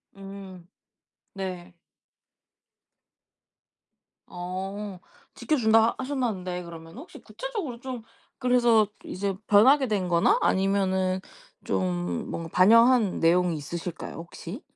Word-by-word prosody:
음. 195 -2 -10 0.7
네. 185 -2 -6 2.5
어 190 +2 -6 0.3
지켜 310 - -1
준다 225 -2 +4
하셨다는데 220 -10 -3
그러면 165 +3 -11
혹시 310 - -11
구체적으로 415 - -6
좀 255 -2 -6 0.4
그래서 240 -4 +4 0.2
이제 195 +1 -3
변하게 260 +7 +5
된 200 -5 -1
거나 170 -1 +3
아니면은 190 -1 +1 0.4
좀 90 -2 -2
뭔가 165 0 -5
반영한 230 +2 +5
내용이 175 +1 +3
있으실까요? 170 +3 -6
혹시? 170 - -8
195 Hz, 220 characters per minute, -26 LUFS, 175-230 Hz, 2.5 s, 변하게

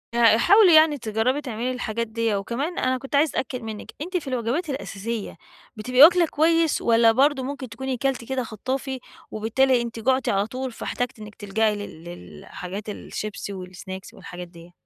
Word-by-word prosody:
آآ 230 -2 +6
حاولي 390 - +6
يعني 310 -1 +6
تجربي 230 +4 0
تعملي 250 -2 -3
الحاجات 230 -2 -3
ديّة، 225 -1 -1
وكمان 240 - -3
أنا 255 0 +1
كنت 270 +2 -5
عايزة 300 +3 +4
أتأكد 250 -1 -4
منِك، 220 -2 -7
أنتِ 360 +4 -2
في 320 - -6
الوجبات 255 +6 -2
الأساسية 230 -5 -5 0.4
بتبقي 250 +4 +1
واكلة 345 +2 +7
كويس، 325 +1 +2
والّا 230 -1 +5
برضه 270 +3 +2
ممكن 270 -1 -5
تكوني 260 +3 -4
كلتِ 265 -1 -1
كده 265 -1 -1
خطّافي، 260 +4 -4 0.3
وبالتالي 245 +4 +2
أنتِ 230 -1 -5
جُعتِ 260 +2 +1
على 200 +1 +1
طول 255 +2 -5
فاحتاجتِ 245 0 -4
إنك 210 0 -10
تلجأي 215 +1 0
لل 205 -6 -8
لل 90 - -11
حاجات 195 +4 -7
الشيبسي، 210 0 -6
والسناكس 185 0 -8
والحاجات 180 0 -9
ديّ؟ 170 0 -15
235 Hz, 170 wpm, -24 LUFS, 215-270 Hz, 0.4 s, واكلة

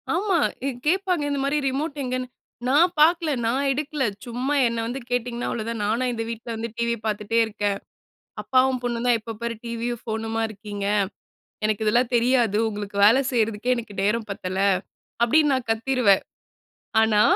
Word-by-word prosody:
ஆமா. 380 0 +1 0.3
இ - - +1 0.2
கேட்பாங்க 365 -2 +1
இந்த 285 -1 -1
மாரி, 280 +2 +1
ரிமோட் 285 +3 -3
எங்கன்னு. 255 0 -2 0.4
"நா 260 - +3 0.2
பாக்கல, 330 +1 +4
நா 225 - +2 0.2
எடுக்கல. 295 +1 -2 0.2
சும்மா 250 +4 -2
என்ன 230 -1 -2
வந்து 250 +3 -4
கேட்டிங்கன்னா, 245 -1 -2
அவ்வளோதான். 230 -1 -3
நானா 230 +5 +1
இந்த 225 -1 -3
வீட்ல 230 +1 -6
வந்து 225 +1 -4
டிவி 235 0 0
பாத்துட்டே 215 +1 0
இருக்கேன்? 205 -2 -2 0.7
அப்பாவும், 260 0 +2
பொண்ணும் 240 0 -2
தான் 245 -1 +5
எப்ப 225 +1 -7
பாரு 235 0 -2
டிவியும், 235 0 -3
ஃபோனுமா 225 0 -3
இருக்கீங்க. 205 -1 -6 0.8
எனக்கு 215 0 0
இதெல்லாம் 240 +3 +2
தெரியாது. 235 -3 +3
உங்களுக்கு 205 -1 -6
வேல 225 +5 +7
செய்றதுக்கே 225 0 +1
எனக்கு 225 -3 -7
நேரம் 215 +2 0
பத்தல" 185 -1 -4 0.7
அப்படீன்னு 295 +4 +4
நா - - +3
கத்திருவேன். 225 -3 +3 0.8
ஆனா, 220 -1 +4
235 Hz, 150 wpm, -24 LUFS, 220-260 Hz, 0.8 s, வேல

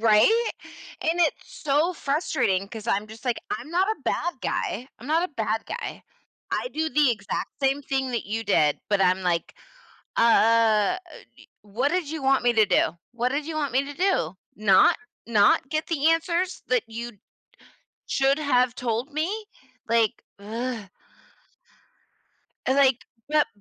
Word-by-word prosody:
Right? 230 - +4 0.5
And 335 +2 +1
it's 320 - +2 0.2
so 300 +5 +2
frustrating 275 - 0
'cause 220 0 -8
I'm 205 0 0
just 220 +2 -12
like, 245 -2 0
"I'm 300 - -4
not 365 +3 +2
a 440 - -2
bad 345 -7 -2
guy 245 +6 -2
I'm 245 - -11
not 325 +3 +2
a - - -30
bad 220 -2 -2
guy. - - -6 0.5
I - - -1
do 315 -5 -2
the 295 -4 +4
exact 210 -3 -3
same 275 +1 +1
thing 265 -1 -1
that 235 - -2
you 225 +2 -3
did," 150 -7 +2
but 205 -2 +2
I'm 185 0 +3
like, 175 -2 -1 0.6
"Uh - - +2
uh, 230 - +4 0.4
d - - -17
what 225 +7 -1
did 355 -5 -1
you 310 -3 -5
want 270 -1 +3
me 245 - +4
to 220 -1 +5
do? 175 -3 +1
What 240 +1 -1
did 290 +2 -2
you 320 -1 -5
want 290 -4 -1
me 270 +2 +3
to 285 - -7
do? 280 - 0 0.2
Not 200 -3 +5 0.3
not 225 +4 +4
get 310 0 -1
the 320 -1 +2
answers 340 +3 -1
that 250 -3 +2
you'd 225 -2 -7 0.9
should 275 +1 +2
have 255 -4 +2
told 245 +4 -2
me?" 380 +9 -2 0.4
Like, 230 0 +2 0.2
ugh! 225 +1 -5 1.8
Like, 265 -2 +3 0.2
but 300 -1 +3
255 Hz, 160 wpm, -25 LUFS, 220-305 Hz, 1.8 s, to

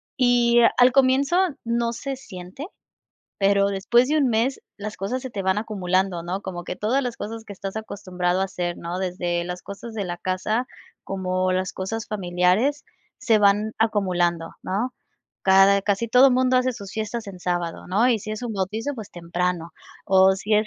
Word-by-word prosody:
Y, 240 -2 +4 0.2
al 250 0 +6
comienzo 270 +4 +3 0.3
no 235 0 0
se 270 +3 -4
siente, 195 - -9 0.7
pero 200 0 +3
después 200 +6 +2
de 305 - +2
un 275 -4 +3
mes 235 +4 0 0.2
las 210 +1 -6
cosas 240 +7 -3
se 260 - -6
te 200 -3 -4
van 190 +1 +1
acumulando, 190 -4 -1
¿no?, 180 +3 -3
como 180 -3 -6
que 180 - -6
todas 250 +6 0
las 245 -2 -4
cosas 225 +1 -6
que 210 - -9
estás 195 0 -6
acostumbrado 185 -4 -2
a - - +2
hacer, 180 -2 -3
¿no?, 170 +2 -4
desde 175 -2 -1
las 180 +1 -6
cosas 210 +3 -8
de 210 -3 -3
la 175 -1 -5
casa, 215 +7 -1 0.4
como 185 -1 -1
las 185 0 -1
cosas 215 +4 -4
familiares, 195 +8 +1 0.3
se 230 -4 +3
van 210 +1 +3
acumulando, 180 -6 +1
¿no? 220 +7 -2 0.5
Cada 195 +1 +6
casi 205 +3 0
todo 255 +3 +6
mundo 255 0 +3
hace 255 0 +1
sus 200 -4 -9
fiestas 220 0 -4
en 190 -2 -8
sábado, 175 -2 -3
¿no?, 210 +7 +3
y 235 -3 +3
si 215 - -7
es 215 +2 -5
un 240 -2 -3
bautizo, 210 +7 -2
pues 220 -5 -9
temprano, 175 0 -2 0.3
o 190 0 +5
si 210 +2 0
es 215 +1 +3
200 Hz, 185 wpm, -23 LUFS, 185-235 Hz, 0.7 s, al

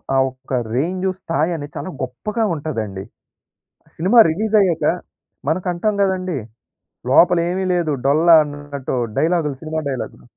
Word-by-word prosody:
ఆ - - +4
ఒక్క 130 +1 -11 0.2
రేంజ్ 180 +8 -1
స్థాయి 165 -1 -1
అనేది 145 -2 -7
చాలా - - -5
గొప్పగా 130 - -3
ఉంటదండి. 110 -11 -4 0.9
సినిమా 190 +9 +4
రిలీజ్ 215 +7 -1
అయ్యాక, 180 -5 +1 0.6
మనకంటాం 180 +5 0
కదండీ! 185 -4 -1 0.7
లోపల 175 +5 +6
ఏమీ 190 +1 -1
లేదు 170 -3 0
డొల్ల 155 +5 +3 0.2
అన్నట్టు 145 -2 -6 0.2
డైలాగులు, 160 -3 +1
సినిమా 160 0 -3
డైలాగ్‌లు. 130 -3 -5
160 Hz, 120 wpm, -20 LUFS, 140-185 Hz, 0.9 s, లోపల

